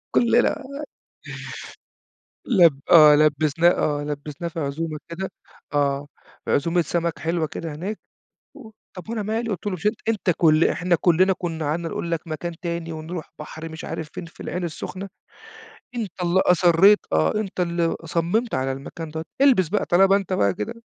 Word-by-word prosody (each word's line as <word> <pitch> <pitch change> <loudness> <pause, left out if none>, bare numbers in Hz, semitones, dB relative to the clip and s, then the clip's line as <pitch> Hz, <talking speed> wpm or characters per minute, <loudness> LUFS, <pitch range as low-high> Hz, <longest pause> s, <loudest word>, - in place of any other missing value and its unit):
كُلّنا. 240 +4 +3 1.8
لب 170 - +5
آه، 155 -3 +9
لبّسناه 155 +2 +3
آه، 145 -4 0
لبّسناه 150 +2 -5
في 165 0 -6
عزومة 155 +2 -3
كده 180 +3 -5 0.4
آه، 140 0 +1 0.4
عزومة 170 +4 +2
سَمَك 170 +1 -2
حلوة 165 0 -1
كده 160 0 -6
هناك 190 +8 -5 0.6
و 245 -7 -12 0.3
"طب 180 +1 -9
وأنا 225 -2 -2
مالي!" 225 +3 -2
قُلت 200 0 -5
له: 205 - 0
"مش 180 +1 -4
أنت 215 +2 +2
أنت 215 -5 +1
كل 155 -1 +4
إحنا 180 0 0
كُلّنا 185 +2 +4
كُنّا 165 -3 -4
قعدنا 165 +3 -1
نقول 170 - -4
لك 165 -2 0
مكان 165 +2 -4
تاني، 170 -1 -3
ونروح 160 +1 -6
بحر 155 +1 -8
مش 160 0 -9
عارف 160 - -5
فين - - -6
في 165 - -17
العين 180 0 -4
السخنة، 185 +4 -6 0.9
أنت 220 -6 -3
اللي 175 +2 +2
أصرّيت" 180 +3 +5
آه. 80 0 +2
"أنت 210 -3 -3
اللي 170 -1 0
صمّمت 175 +9 0
على 130 +1 -1
المكان 140 +4 -7
دوّة، 160 +1 -5 0.2
إلبس 250 - +5
بقى 210 +3 0
طالما 195 +2 +5
أنت 195 -2 -1
بقى 100 - +2
كده." 105 - -4
170 Hz, 165 wpm, -23 LUFS, 155-190 Hz, 1.8 s, آه